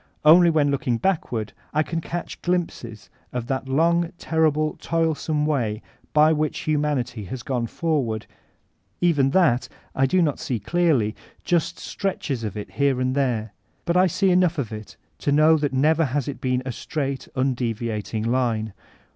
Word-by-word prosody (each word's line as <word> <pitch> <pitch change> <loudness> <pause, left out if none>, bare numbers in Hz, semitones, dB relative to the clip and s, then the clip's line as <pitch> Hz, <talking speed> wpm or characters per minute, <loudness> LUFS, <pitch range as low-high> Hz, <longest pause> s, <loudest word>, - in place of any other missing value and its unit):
Only 170 +3 +8
when 150 -3 +2
looking 125 -4 0
backward, 120 - -1 0.2
I 155 - +3
can 165 +1 -3
catch 175 +1 -6
glimpses 165 -11 -3 0.2
of 125 -2 -3
that 135 +1 -3
long, 170 +4 +2
terri 160 -2 +2
ble, 155 +1 -1
toilsome 160 -2 0
way 120 -8 -1 0.3
by 155 +1 +5
which 155 0 -1
humanity 140 -7 -1
has 120 +6 -6
gone 125 -5 -1
forward; 130 -9 -1 0.7
even 145 -6 +3
that 145 -6 +3 0.2
I 135 0 +2
do 180 +5 +3
not 150 -4 0
see 120 -4 -2
clearly, 120 - +1 0.2
— - - -33
just 170 -3 0
stretches 150 - -3
of 105 -2 -4
it 105 - -6
here 140 -2 +1
and 130 0 0
tfiere. 120 -6 0 0.3
But 170 -1 0
I 185 +1 +5
see 190 +2 +2
enough 180 -2 +3
of 125 -7 -2
it 105 -1 -9 0.2
to 145 - 0
know 155 +2 +5
that 145 -2 -1
never 155 +5 +3
has 140 +1 -2
it 140 - -5
been 130 0 0
a 130 - -2
straight, 135 0 -4
nndeviating 115 -4 -2
line. 115 -3 0
140 Hz, 165 wpm, -23 LUFS, 120-160 Hz, 0.7 s, Only